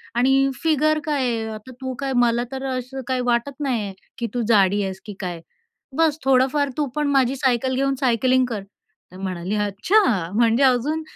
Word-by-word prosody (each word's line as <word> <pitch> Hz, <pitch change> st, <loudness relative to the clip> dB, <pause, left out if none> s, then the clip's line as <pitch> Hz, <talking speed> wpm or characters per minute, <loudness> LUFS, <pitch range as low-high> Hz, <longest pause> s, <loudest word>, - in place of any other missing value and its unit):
आणि 270 Hz, +2 st, +3 dB
फिगर 310 Hz, 0 st, +2 dB
काय 290 Hz, -3 st, 0 dB
आहे. 230 Hz, -3 st, -1 dB
आता 215 Hz, +4 st, -10 dB
तू 260 Hz, 0 st, -3 dB
काय 270 Hz, -1 st, -2 dB
मला 235 Hz, 0 st, +2 dB
तर 265 Hz, 0 st, -5 dB
असं 260 Hz, +2 st, -6 dB
काही 255 Hz, -1 st, 0 dB
वाटत 245 Hz, +4 st, 0 dB
नाहीये, 230 Hz, -9 st, -2 dB, 0.2 s
की 235 Hz, -, -2 dB
तू 245 Hz, -, -1 dB
जाडी 205 Hz, -1 st, +4 dB
आहेस 190 Hz, 0 st, -4 dB
की 210 Hz, -, -7 dB
काय. 175 Hz, -3 st, -4 dB, 0.6 s
बस 320 Hz, -2 st, +3 dB
थोडंफार 270 Hz, +2 st, +3 dB
तू 295 Hz, -, +1 dB
पण 300 Hz, -1 st, 0 dB
माझी 265 Hz, -1 st, +2 dB
सायकल 260 Hz, -1 st, +1 dB
घेऊन 275 Hz, +1 st, +1 dB
सायकलिंग 255 Hz, 0 st, +2 dB
कर." 220 Hz, -5 st, -4 dB, 0.5 s
तर 185 Hz, -, -12 dB
म्हणाली, 185 Hz, +1 st, -3 dB
"अच्छा 210 Hz, -, +1 dB
म्हणजे 235 Hz, +3 st, +3 dB
अजून 270 Hz, +5 st, +2 dB
255 Hz, 180 wpm, -22 LUFS, 220-275 Hz, 0.6 s, जाडी